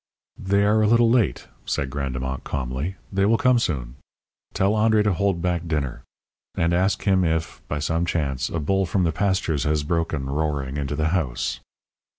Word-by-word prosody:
"They 100 +1 +2
are 105 +1 +3
a 105 - +3
little 115 +1 +4
late," 120 -4 +1 0.2
said 65 +1 -2
Grandemont, 65 -2 -3
calmly. 70 +6 -3 0.2
"They 95 0 +2
will 115 +1 +4
come 125 0 +4
soon. 65 - -3 0.5
Tell 95 +1 +1
André 110 0 +3
to 105 -2 +2
hold 95 -1 0
back 90 -1 -1
dinner. 75 -5 -2 0.5
And 85 0 +1
ask 95 +3 +1
him 95 -2 +3
if, 80 -1 -1
by 75 - -2
some 80 +4 -1
chance, 70 -6 -1
a 85 - -2
bull 95 +5 +1
from 95 +2 +1
the 85 - +2
pastures 90 -4 0
has 75 0 +1
broken, 80 -3 -1
roaring, 70 -2 -2
into 75 0 -2
the 75 +2 0
house." 65 -8 -1
80 Hz, 175 wpm, -23 LUFS, 70-95 Hz, 0.5 s, little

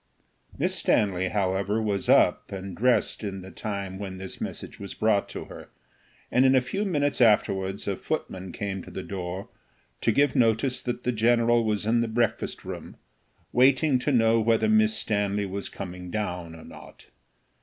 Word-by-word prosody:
Miss - - +1
Stanley, 95 -3 +1
however, 100 +1 0
was 105 -3 -2
up - - +4
and 95 -1 -6
dressed 125 -1 +1
at 95 -2 -5
the 95 - -10
time 100 -3 -5
when 95 -2 -6
this 95 0 -6
message - - -6
was 100 -1 -7
brought 110 -2 +1
to - - -6
her, - - -11 0.6
and 125 - +4
a - - +7
few 195 +12 -3
minutes 145 -8 0
afterwards 100 -3 +2
a 100 - 0
footman 95 0 -4
came 95 -2 -4
to - - -11
the - - -6
door, 95 0 -5 0.5
to - - +3
give 140 +3 +2
notice 120 +2 +2
that 120 0 -4
the 125 - +1
general 120 +1 +3
was 105 -2 -1
in 115 +2 +2
the 115 - 0
breakfast 115 0 -1
room, - - -7 0.6
waiting 130 +2 +4
to 145 - 0
know 115 -2 +4
whether 110 0 +2
Miss 110 0 +4
Stanley 105 -1 0
was 100 +1 -5
coming 90 -1 -7
down 90 -5 -4
or 80 - -12
not. - - -13
105 Hz, 170 wpm, -26 LUFS, 95-120 Hz, 0.6 s, a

